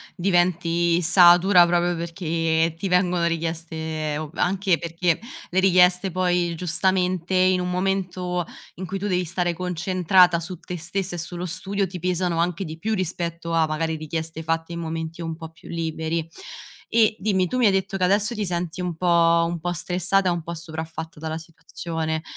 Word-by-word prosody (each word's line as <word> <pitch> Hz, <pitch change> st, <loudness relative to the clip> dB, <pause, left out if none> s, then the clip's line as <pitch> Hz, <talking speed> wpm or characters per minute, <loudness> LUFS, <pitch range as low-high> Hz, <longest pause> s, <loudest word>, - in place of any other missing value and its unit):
diventi 175 Hz, -2 st, +2 dB
satura 175 Hz, +1 st, +6 dB
proprio 175 Hz, 0 st, +1 dB
perché 165 Hz, -1 st, -1 dB
ti 195 Hz, -, -3 dB
vengono 180 Hz, -1 st, +2 dB
richieste 160 Hz, -2 st, -3 dB
o 155 Hz, -2 st, -5 dB
anche 185 Hz, -1 st, +1 dB
perché 170 Hz, 0 st, -1 dB, 0.3 s
le 185 Hz, -, +1 dB
richieste 185 Hz, 0 st, +4 dB
poi, 180 Hz, -1 st, +1 dB
giustamente, 180 Hz, +1 st, 0 dB
in 185 Hz, 0 st, +4 dB
un 180 Hz, 0 st, -2 dB
momento 180 Hz, -2 st, -1 dB, 0.3 s
in 185 Hz, -, -6 dB
cui 195 Hz, +1 st, -4 dB
tu 205 Hz, -, -2 dB
devi 180 Hz, -2 st, 0 dB
stare 175 Hz, +1 st, -1 dB
concentrata 180 Hz, 0 st, +3 dB
su 170 Hz, 0 st, -7 dB
te 180 Hz, -, -6 dB
stessa 175 Hz, +2 st, -3 dB
e -, -, -5 dB
sullo 175 Hz, +2 st, -5 dB
studio, 190 Hz, +3 st, -2 dB
ti 180 Hz, 0 st, -7 dB
pesano 180 Hz, -1 st, 0 dB
anche 175 Hz, +2 st, 0 dB
di 160 Hz, +1 st, -7 dB
più 220 Hz, +6 st, -2 dB
rispetto 170 Hz, -3 st, -3 dB
a 165 Hz, -1 st, +3 dB
magari 160 Hz, +1 st, -2 dB
richieste 160 Hz, +1 st, -5 dB
fatte 165 Hz, +1 st, -2 dB
in 170 Hz, -, -5 dB
momenti 160 Hz, 0 st, -5 dB
un 165 Hz, -1 st, -4 dB
po' 160 Hz, -1 st, -9 dB
più 165 Hz, -, -17 dB
liberi. 165 Hz, 0 st, -3 dB, 0.6 s
E 220 Hz, -2 st, +3 dB
dimmi: 190 Hz, -3 st, +1 dB
tu 255 Hz, -, -2 dB
mi 245 Hz, -, +3 dB
hai 200 Hz, -, +6 dB
detto 195 Hz, +1 st, -1 dB
che 185 Hz, -, -1 dB
adesso 205 Hz, +5 st, +2 dB
ti 210 Hz, -1 st, -2 dB
senti 175 Hz, 0 st, -3 dB
un 175 Hz, -2 st, -3 dB
po' 170 Hz, -1 st, +4 dB
un 170 Hz, -1 st, -4 dB
po' 175 Hz, +1 st, -2 dB
stressata, 180 Hz, +2 st, +1 dB
un 170 Hz, -1 st, -2 dB
po' 170 Hz, +2 st, -6 dB
sopraffatta 160 Hz, -1 st, -7 dB
dalla 160 Hz, 0 st, -4 dB
situazione, 160 Hz, 0 st, -5 dB
175 Hz, 175 wpm, -23 LUFS, 165-185 Hz, 0.6 s, satura